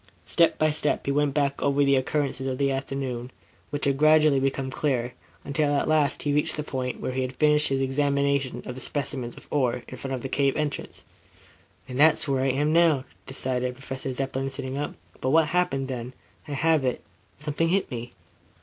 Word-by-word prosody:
Step 170 -1 +3
by 155 0 +3
step 150 -1 -1
he 140 - +1
went 145 0 +2
back 140 -1 0
over 140 0 +3
the 140 0 +4
occurrences 135 0 0
of 130 -1 -2
the 140 0 +1
afternoon, 135 -2 -3 0.4
which 145 -1 -1
gradually 155 -1 +5
became 135 0 -1
clearer, 125 -4 -1 0.3
until 145 0 +1
at 140 - +1
last 155 -2 +2
he 145 - +1
reached 150 +2 +1
the 150 - -2
point 130 -3 -3
where - - -3
he 130 +1 -1
had 130 0 -3
finished 150 +1 +4
his 135 0 0
examination 140 0 0
of 125 - -5
the 130 - -9
specimens 130 -4 -3
of - - -13
ore, 125 -4 +1
in 130 - -8
front 135 +1 -3
of 125 - -7
the - - -2
cave 135 0 +1
entrance. 150 -2 -4 0.8
"And 125 0 -5
that's 155 +1 +5
where 135 -2 +1
I 135 - +2
am 145 +4 +1
now," 160 -5 +4 0.2
decided 125 -1 -2
Professor 135 0 -5
Zepplin, 135 +1 -2
sitting 130 -1 -5
up. 145 +1 -3 0.3
"But, 130 - 0
what 155 +1 +4
happened 140 -6 +1
then? 125 -1 -5 0.3
I 145 - -4
have 160 +1 +2
it. 125 -1 -1 0.3
Something 150 +3 -1
hit 195 +2 +1
me." 120 -1 -6
140 Hz, 195 wpm, -26 LUFS, 130-150 Hz, 0.8 s, gradually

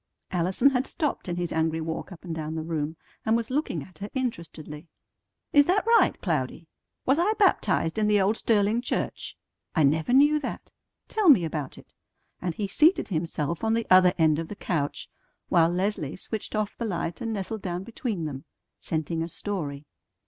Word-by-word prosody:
'" - - -33
Allison 185 +10 +3
had 260 0 0
stopped 300 - -2
in 175 - -1
his 175 -1 -2
angry 160 0 +1
walk 160 +4 -4
up 180 0 -11
and 170 - -4
down 160 0 -4
the 160 - -3
room, 160 -1 -2 0.3
and 220 +1 +3
was 235 +1 -4
looking 260 - -1
at 185 - -17
her 205 +1 -5
interestedly. 165 - -5 0.7
"Is 285 -1 +6
that 390 +4 +2
right, 460 -3 +4
Cloudy? 160 -2 -1 0.4
Was 270 +4 +3
I 395 +5 +3
baptized 220 - +2
in 210 - +2
the 210 -1 +4
old 200 +3 +2
Sterling 215 +1 +2
church? 245 - -3 0.4
I 160 - +4
never 155 +9 +2
knew 290 +4 +5
that. 295 - -6 0.4
Tell 425 -5 +2
me 195 - +7
about 150 -4 -4
it," - - -16 0.5
and 175 -2 -2
he 210 - -2
seated 305 - +3
himself 165 -1 -2
on 225 0 +2
the 230 - -1
other 185 -1 +7
end 160 -2 +3
of 165 - -4
the 210 - -7
couch, 150 -7 -2 0.4
while 165 -1 +5
Leslie 180 -5 -1
switched 215 +3 -5
off 215 -1 -1
the 235 - -4
light 175 -1 -3
and 225 -1 -2
nestled 205 +1 -4
down 180 -1 -3
between 220 -5 -3
them, 135 -3 -6 0.3
scenting 160 +1 -2
a 165 - -2
story. 155 -6 -4
185 Hz, 190 wpm, -26 LUFS, 160-230 Hz, 0.7 s, me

